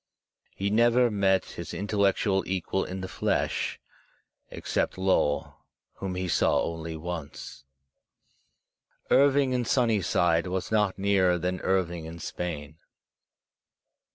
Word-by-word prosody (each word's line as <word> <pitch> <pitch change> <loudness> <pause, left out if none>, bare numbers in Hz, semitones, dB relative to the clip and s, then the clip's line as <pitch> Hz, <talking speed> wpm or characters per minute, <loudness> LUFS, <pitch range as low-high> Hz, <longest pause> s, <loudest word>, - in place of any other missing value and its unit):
He 100 +1 -2
never 120 +2 +4
met 95 -2 +2
his - - -8
intellectual 100 -1 +1
equal 95 +1 -1
in 95 +1 -6
the 95 - -4
flesh, 95 - -1 0.7
except - - -2
Lowell, 95 -6 +1 0.4
whom 95 -2 -4
he 90 0 -2
saw - - +2
only 80 -1 -5
once. 80 -4 -7 1.5
Irving 140 0 +4
in 125 -1 +1
Sunnyside 95 -9 +2
was 95 +2 -3
not 105 -3 +2
nearer 95 -3 +2
than 90 +1 -2
Irving 85 -3 0
in 80 +1 -8
Spain. 80 -2 -6
95 Hz, 110 wpm, -27 LUFS, 85-100 Hz, 1.5 s, never